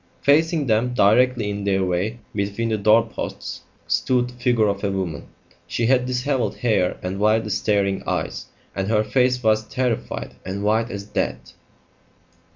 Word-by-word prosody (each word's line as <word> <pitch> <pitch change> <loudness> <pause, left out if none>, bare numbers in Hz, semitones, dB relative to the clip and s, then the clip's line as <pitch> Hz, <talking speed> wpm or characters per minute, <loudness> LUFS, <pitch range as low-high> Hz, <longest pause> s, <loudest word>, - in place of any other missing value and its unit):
Facing 155 +1 +3
them, 120 +1 +1
directly 115 0 +3
in 100 0 -4
their 95 -1 +1
way 90 +6 -1 0.2
between 100 +3 -2
the 110 - 0
doorposts, 110 +2 0 0.2
stood 125 -1 +1
the - - -12
figure 120 -3 +2
of 100 0 -2
a 100 - +1
woman. 95 -6 -4 0.4
She 115 - -1
had 125 +1 +3
dishevelled 125 -3 -1
hair 110 -7 +1
and 95 +2 -3
wildly 110 +1 +2
staring 100 -1 +1
eyes, - - -3 0.3
and 95 0 -2
her 110 0 +2
face 125 +3 +1
was 110 0 +2
terrified 125 -3 -2
and 95 +2 -4
white 110 +3 +1
as 100 -3 -5
death. 105 - -3
110 Hz, 155 wpm, -22 LUFS, 100-125 Hz, 0.4 s, Facing